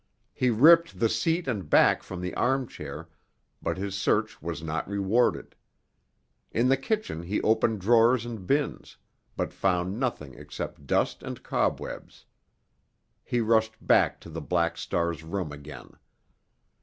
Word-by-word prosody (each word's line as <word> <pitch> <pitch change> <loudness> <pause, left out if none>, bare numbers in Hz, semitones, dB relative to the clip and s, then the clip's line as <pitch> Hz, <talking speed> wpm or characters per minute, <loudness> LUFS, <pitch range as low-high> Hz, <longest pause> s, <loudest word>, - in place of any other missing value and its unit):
He 125 - +1
ripped 165 +9 +5
the 115 - +3
seat 160 +11 0
and 100 - -3
back - - +5
from 95 -2 -7
the 90 0 -4
armchair, 85 - -2 0.5
but - - -2
his 100 0 -4
search 95 - 0
was 80 -1 -5
not 80 0 -3
rewarded. 100 +4 +1 1.0
In 120 +3 +2
the 135 - +5
kitchen 135 - -3
he 95 +5 -2
opened 110 -1 +2
drawers 115 +3 +4
and 110 -6 -7
bins, 145 0 -1 0.4
but - - -2
found 95 +2 0
nothing 95 - -3
except 70 - -8
dust - - +1
and - - -7
cobwebs. - - -3 1.0
He 120 - -1
rushed 110 0 +2
back - - +3
to 85 - -11
the 80 +1 -5
Black 85 +1 0
Star's 85 -1 -2
room 85 -1 -4
again. 75 -1 -11
100 Hz, 140 wpm, -27 LUFS, 85-120 Hz, 1.0 s, ripped